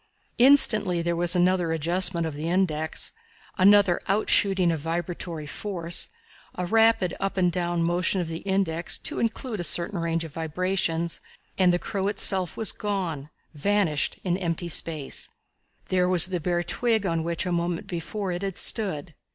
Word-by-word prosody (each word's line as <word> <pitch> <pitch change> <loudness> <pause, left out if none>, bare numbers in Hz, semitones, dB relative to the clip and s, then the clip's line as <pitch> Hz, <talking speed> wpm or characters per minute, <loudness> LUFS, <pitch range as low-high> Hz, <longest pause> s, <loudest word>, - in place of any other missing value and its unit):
Instantly 215 -9 +5
there 170 0 -1
was 175 +1 +3
another 180 -1 +2
adjustment 170 +2 +3
of 160 - -4
the 155 +3 -4
index, 160 -4 0 0.5
another 200 -1 +5
outshooting 195 -3 +2
of 160 - -3
vibratory 165 0 -4
force, 170 +1 -2 0.5
a 180 - -3
rapid 225 -2 +3
up 195 0 -3
and 180 -2 +2
down 175 -1 -1
motion 175 +3 +1
of 175 - -2
the 165 0 -5
index 190 -4 -1
to - - -3
include 230 -1 -3
a - - -2
certain 175 +3 -1
range 165 0 -1
of 160 -3 -9
vibrations, 170 0 -2 0.3
and 185 -2 +3
the 175 - +1
crow 195 +1 -3
itself 190 -3 +2
was 220 - +3
gone 180 -9 -4 0.2
vanished 165 -1 0
in 180 -1 0
empty 170 -2 -3
space! 155 -3 -3 0.6
There 180 -1 +1
was 180 -3 +7
the 185 -1 -3
bare 175 +1 -1
twig 220 +3 0
on 165 -3 -1
which 170 +2 -3
a 180 - -2
moment 170 0 -2
before 185 +3 -4
it 175 +1 -4
had 195 -2 -4
stood. 180 -8 -1
175 Hz, 160 wpm, -25 LUFS, 165-195 Hz, 0.6 s, was